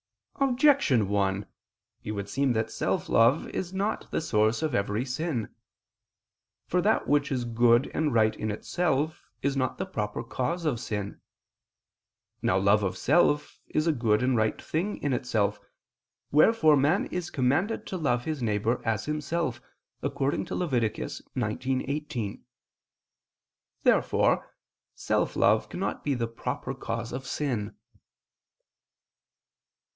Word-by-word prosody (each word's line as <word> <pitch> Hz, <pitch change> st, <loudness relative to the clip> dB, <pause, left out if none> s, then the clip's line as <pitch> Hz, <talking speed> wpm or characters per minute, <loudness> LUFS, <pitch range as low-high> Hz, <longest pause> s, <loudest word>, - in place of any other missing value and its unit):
Objection 265 Hz, -, +3 dB
1: 100 Hz, -1 st, 0 dB, 0.6 s
It 105 Hz, -, -4 dB
would 100 Hz, -1 st, -4 dB
seem 135 Hz, +4 st, +1 dB
that 110 Hz, -1 st, -1 dB
self -, -, -1 dB
love 115 Hz, +7 st, +4 dB
is 180 Hz, -1 st, -4 dB
not 195 Hz, +3 st, -2 dB
the -, -, -1 dB
source 110 Hz, -3 st, +1 dB
of 155 Hz, -4 st, -1 dB
every 105 Hz, +3 st, 0 dB
sin. 135 Hz, -3 st, -2 dB, 1.2 s
For 180 Hz, -, +1 dB
that 215 Hz, +4 st, +2 dB
which 145 Hz, 0 st, +2 dB
is 125 Hz, -3 st, -1 dB
good 120 Hz, +1 st, +3 dB
and 155 Hz, -2 st, +1 dB
right 110 Hz, -2 st, +3 dB
in 110 Hz, -, -3 dB
itself 155 Hz, +6 st, -1 dB
is 140 Hz, 0 st, +1 dB
not 130 Hz, -1 st, -1 dB
the 190 Hz, -, -2 dB
proper 105 Hz, -, -3 dB
cause 130 Hz, +8 st, -2 dB
of 135 Hz, -7 st, 0 dB
sin. 105 Hz, -3 st, -4 dB, 1.2 s
Now 90 Hz, -, +2 dB
love 100 Hz, +2 st, +4 dB
of 95 Hz, -2 st, -2 dB
self 145 Hz, 0 st, +2 dB
is 155 Hz, -, 0 dB
a 165 Hz, -, +4 dB
good 115 Hz, -5 st, +1 dB
and 130 Hz, 0 st, +2 dB
right 110 Hz, -1 st, +1 dB
thing 185 Hz, +7 st, -2 dB
in 145 Hz, -2 st, +1 dB
itself: 105 Hz, -5 st, 0 dB, 0.7 s
wherefore 155 Hz, 0 st, +5 dB
man 145 Hz, +7 st, +2 dB
is 180 Hz, -1 st, -4 dB
commanded 145 Hz, -, 0 dB
to -, -, -5 dB
love 125 Hz, -7 st, 0 dB
his 155 Hz, -4 st, -3 dB
neighbor 110 Hz, +1 st, 0 dB
as 110 Hz, -2 st, -1 dB
himself 150 Hz, -4 st, -2 dB, 0.4 s
(Lev. -, -, -3 dB
19:18). 130 Hz, -, -2 dB, 1.4 s
Therefore -, -, +3 dB, 0.5 s
self -, -, 0 dB
love -, -, +3 dB
cannot -, -, -3 dB
be 145 Hz, -2 st, 0 dB
the 115 Hz, -2 st, -1 dB
proper 115 Hz, 0 st, -4 dB
cause 115 Hz, 0 st, -4 dB
of 130 Hz, +1 st, -5 dB
sin. 115 Hz, -8 st, -2 dB
130 Hz, 130 wpm, -28 LUFS, 110-155 Hz, 1.4 s, wherefore